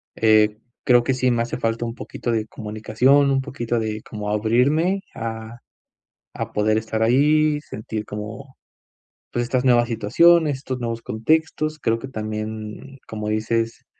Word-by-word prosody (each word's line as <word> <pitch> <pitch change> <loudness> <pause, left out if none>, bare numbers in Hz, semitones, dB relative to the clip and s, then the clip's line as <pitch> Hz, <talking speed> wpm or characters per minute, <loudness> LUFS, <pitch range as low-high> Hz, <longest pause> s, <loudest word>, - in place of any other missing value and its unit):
eh, 110 -1 +4 0.3
creo 120 -1 +4
que 135 - +2
sí 130 0 +1
me 120 -1 +1
hace 120 - -4
falta 115 +1 -1
un 115 0 -5
poquito 120 - -6
de 110 -1 0
comunicación, 110 +7 +2
un 135 - +2
poquito 120 -4 -3
de 110 -1 -3
como 105 -1 -5
abrirme 125 - +2 0.2
a 115 0 -6 0.7
a - - -5
poder 110 +1 +2
estar 110 0 -2
ahí, 150 +5 +3
sentir 110 -5 -6
como 105 +5 -8 0.8
pues, 120 - 0
estas 125 +1 -1
nuevas 120 -2 +4
situaciones, 150 +7 +4
estos 130 -1 -5
nuevos 115 -1 -3
contextos. 155 +6 0
Creo 115 -5 0
que 135 - -8
también, 110 +2 -6
como 105 -1 -4
dices, 115 +1 -1
115 Hz, 150 wpm, -22 LUFS, 110-135 Hz, 0.8 s, eh